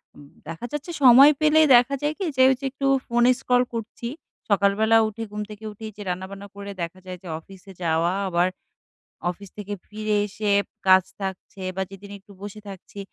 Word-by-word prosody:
উম 145 - -14 0.2
দেখা 165 +8 -6
যাচ্ছে 295 +3 -5
সময় 265 +3 +9
পেলেই 310 0 +5
দেখা 245 +3 +4
যায় 295 +1 0
কি 390 - -3
যে 260 - +5
ওইযে 265 +1 0
একটু 275 +1 -2 0.2
ফোনে 240 +1 +3
স্ক্রল 250 -1 +2
করছি। 230 +1 -5 0.4
সকালবেলা 205 +3 +3
উঠে, 215 +1 -6
ঘুম 210 0 -4
থেকে 210 0 -11
উঠেই 215 +1 -8
যে - - -8
রান্নাবান্না 190 +2 -5
করে 200 0 -7
দেখা 170 +2 -5
যায় 185 -1 -7
যে - - -10
অফিসে 195 +3 -15
যাওয়া। 165 +1 +1
আবার 175 -1 +2 0.8
অফিস 200 +3 -10
থেকে 205 0 -5
ফিরে 215 0 -2
এসে 210 +1 -3 0.4
কাজ 185 -1 +7 0.2
থাকছে 190 0 -6
বা 190 - 0
যেদিন 195 +1 -11
একটু 200 +1 -18
বসে 205 +1 -8
থাকছি। 195 +1 -11
205 Hz, 180 wpm, -24 LUFS, 190-240 Hz, 0.8 s, সময়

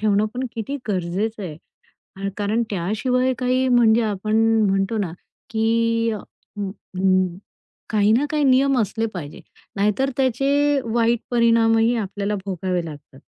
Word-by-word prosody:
ठेवणं 210 0 +2
पण 255 +1 -2
किती 230 +5 -4
गरजेचं 200 +3 -2
आहे, 160 -3 -10 0.6
कारण 210 +3 0
त्याशिवाय 235 +8 0
काही 255 +1 +1
म्हणजे 235 -2 +4
आपण 215 +1 -1 0.3
म्हणतो 195 +3 0
ना, 190 -6 -2 0.4
की 230 0 +1
अ, 215 - -3 0.4
अ, 190 -1 -7 0.9
काही 210 -1 +3
ना 250 +6 +3
काही 300 -1 0
नियम 270 0 +4
असले 225 +2 -1
पाहिजे. 155 -6 -7 0.3
नाहीतर 210 +7 +1
त्याचे 275 +3 +2
वाईट 230 0 +1
परिणामही 230 0 +3
आपल्याला 205 -1 -2
भोगावे 180 -2 -2
लागतात. 145 -3 -11
220 Hz, 125 wpm, -22 LUFS, 200-245 Hz, 0.9 s, म्हणजे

